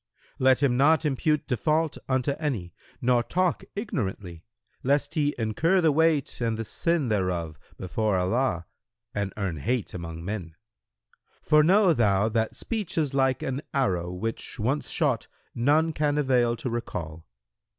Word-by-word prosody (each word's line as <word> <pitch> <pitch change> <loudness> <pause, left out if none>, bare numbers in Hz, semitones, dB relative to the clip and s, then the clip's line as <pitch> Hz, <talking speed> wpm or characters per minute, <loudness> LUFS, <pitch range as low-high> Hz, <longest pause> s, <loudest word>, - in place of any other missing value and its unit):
Let 130 +1 +4
him 125 -3 +3
not 155 +4 +4
impute 150 +1 +1
default 155 +5 0
unto 130 +1 +1
any 115 - -3 0.3
nor 120 -1 +4
talk 180 +7 0
ignorantly, 95 - -4 0.4
lest 140 +2 +1
he 145 -2 +1
incur 125 - +2
the 160 -3 +4
weight 155 -4 +1
and 115 -2 0
the 115 - -4
sin 165 - 0
thereof 90 -7 -1 0.2
before 105 +2 -1
Allah 90 -1 0 0.5
and 100 -1 -2
earn 95 -6 -2
hate 120 - -2
among 85 -1 -6
men; 90 -5 -5 0.9
for 150 0 +5
know 190 +2 +5
thou 105 -4 +2
that 110 0 -1
speech 215 -8 -4
is 150 -4 +1
like 135 -2 +1
an 135 +1 -2
arrow 90 -10 0
which 110 +6 -5
once 130 +7 -1
shot - - 0 0.3
none 155 +6 +2
can 150 -1 0
avail 125 -4 +2
to 125 - -4
recall. 80 -9 -5
125 Hz, 145 wpm, -26 LUFS, 100-150 Hz, 0.9 s, for